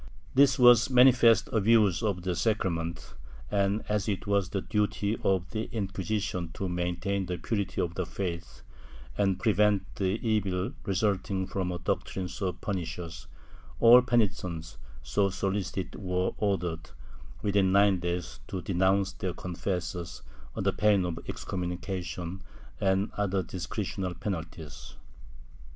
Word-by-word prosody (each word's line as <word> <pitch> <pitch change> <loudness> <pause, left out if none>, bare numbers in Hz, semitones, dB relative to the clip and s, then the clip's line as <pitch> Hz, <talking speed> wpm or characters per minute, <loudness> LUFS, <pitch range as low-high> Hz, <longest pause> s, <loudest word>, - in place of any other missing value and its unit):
This 135 -1 +5
was 120 -2 +7
a - - -5
manifest 120 -3 +6
abuse 110 -4 +4
of 100 -5 -1
the 90 -1 -1
sacra 95 +2 +1
ment 85 0 -5 0.4
and, 100 +1 +1
as 105 0 0
it 95 -3 -2
was 100 -2 +1
the 95 - -2
duty 105 +1 0
cf 95 -2 0
the 110 0 -3
Inquisition 100 -4 -2
to 95 - -3
maintain 90 +2 -2
the 90 0 -2
purity 100 +3 -2
of 85 - -2
the 90 -2 -3
faith 85 -10 -5 0.5
and 95 +2 +1
prevent 105 -1 +3
the 95 +3 0
evil 100 -4 0 0.2
resulting 95 -1 0
from 95 -1 -2
a 90 - -3
doctrine 90 +1 -2
so 90 +1 -2
pernicious, 85 -4 -5 0.5
all 120 +2 +9
penitents 95 -9 -1 0.2
so 100 -1 +1
solicited 95 -1 -2
were 90 -1 -1
ordered, 90 -6 -1 0.5
within 100 -2 +2
nine 100 -1 +4
days, 85 0 -3
to 90 -2 -5
denounce 95 +1 +2
their 90 -1 -4
confessors, 90 -1 -4 0.3
under - - +1
pain 105 -3 +3
of 85 -2 -3
exconnnunica 90 +1 -4
tion 90 +2 -6 0.4
and 95 +1 +1
other 100 -2 0
discretional 90 +1 -4
penalties. 80 -5 -6
95 Hz, 135 wpm, -29 LUFS, 90-105 Hz, 0.5 s, all